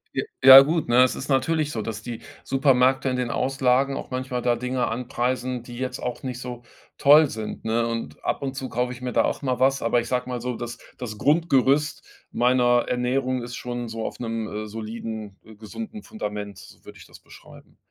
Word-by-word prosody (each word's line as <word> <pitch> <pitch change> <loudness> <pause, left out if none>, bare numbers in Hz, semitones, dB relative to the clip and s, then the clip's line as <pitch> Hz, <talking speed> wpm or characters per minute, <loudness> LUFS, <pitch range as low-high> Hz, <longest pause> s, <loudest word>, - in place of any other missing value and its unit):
J - - -1 0.2
ja 135 +1 +12
gut, 155 -1 0
ne? 125 +2 +6
Es 130 - +1
ist 135 - -7
natürlich 150 +2 +1
so, 110 - -3
dass 110 -1 -5
die 120 0 -7 0.2
Supermärkte 135 -1 +2
in 130 - -1
den 125 -1 -2
Auslagen 135 +1 +1
auch - - -6
manchmal 130 -1 -3
da 120 0 +2
Dinge 125 +1 -2
anpreisen, 125 +1 -2
die 120 0 -10
jetzt 130 0 -4
auch 125 - -5
nicht 125 -2 -5
so 125 -1 -7 0.3
toll 150 +1 +6
sind, 110 -3 -6
ne? 115 +1 0
Und 115 0 -5
ab - - -1
und 135 -1 -4
zu 130 -1 -5
kaufe 125 +1 -1
ich 125 0 -9
mir 125 -1 -4
da - - +3
auch - - -2
mal 130 -2 -1
was, 135 +1 +3
aber 120 +1 +2
ich 120 - -8
sage 125 +1 -1
mal 125 -1 -4
so, 125 0 -3
das 120 +1 -6 0.2
das 110 -4 -7
Grundgerüst 145 -1 +2 0.3
meiner 120 -1 +3
Ernährung 125 0 -1
ist 120 0 -7
schon 120 -1 -5
so 115 0 -5
auf - - -4
einem, 110 -2 -4
äh, - - -9
soliden, 110 -1 -7
äh, 110 - -14
gesunden 215 - -8
Fundament, 105 - -6
so - - -15
würde - - -12
ich - - -14
das - - -16
beschreiben. - - -17
125 Hz, 210 wpm, -24 LUFS, 115-135 Hz, 0.3 s, ja